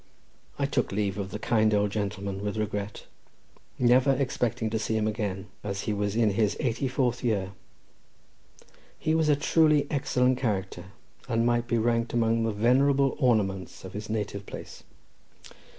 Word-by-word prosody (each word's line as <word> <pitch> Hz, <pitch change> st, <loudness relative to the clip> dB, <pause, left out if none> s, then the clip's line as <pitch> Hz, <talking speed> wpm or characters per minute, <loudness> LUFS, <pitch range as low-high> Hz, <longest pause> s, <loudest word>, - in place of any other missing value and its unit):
I -, -, +1 dB
took -, -, 0 dB
leave 100 Hz, 0 st, -1 dB
of 95 Hz, -1 st, -3 dB
the 100 Hz, -, -5 dB
kind 110 Hz, -1 st, +2 dB
old 105 Hz, 0 st, +1 dB
gentleman 100 Hz, -1 st, -3 dB
with 105 Hz, +1 st, -3 dB
regret, 105 Hz, -1 st, -3 dB, 0.7 s
never 125 Hz, +3 st, +4 dB
expecting 120 Hz, -4 st, -1 dB
to 110 Hz, -, 0 dB
see 110 Hz, 0 st, -1 dB
him 110 Hz, 0 st, 0 dB
again, 100 Hz, -3 st, -3 dB, 0.2 s
as 100 Hz, -1 st, -3 dB
he 105 Hz, -, -2 dB
was 105 Hz, 0 st, -1 dB
in 110 Hz, -2 st, +3 dB
his 105 Hz, 0 st, +1 dB
eighty 125 Hz, +2 st, -1 dB
fourth 125 Hz, -2 st, 0 dB
year—he 100 Hz, +8 st, -7 dB
was 160 Hz, -1 st, +2 dB
a 145 Hz, -, +5 dB
truly 155 Hz, 0 st, +3 dB
excellent 130 Hz, -3 st, +1 dB
character, 95 Hz, -7 st, -2 dB, 0.4 s
and 115 Hz, -1 st, +1 dB
might 120 Hz, 0 st, +1 dB
be 120 Hz, -, +1 dB
ranked 115 Hz, +1 st, 0 dB
amongst 115 Hz, -1 st, +2 dB
the 115 Hz, -, 0 dB
venerable 135 Hz, +3 st, +3 dB
ornaments 100 Hz, -, 0 dB
of 95 Hz, -, -9 dB
his 105 Hz, +1 st, -6 dB
native 105 Hz, -2 st, -3 dB
place. -, -, -9 dB
110 Hz, 155 wpm, -27 LUFS, 100-125 Hz, 0.7 s, a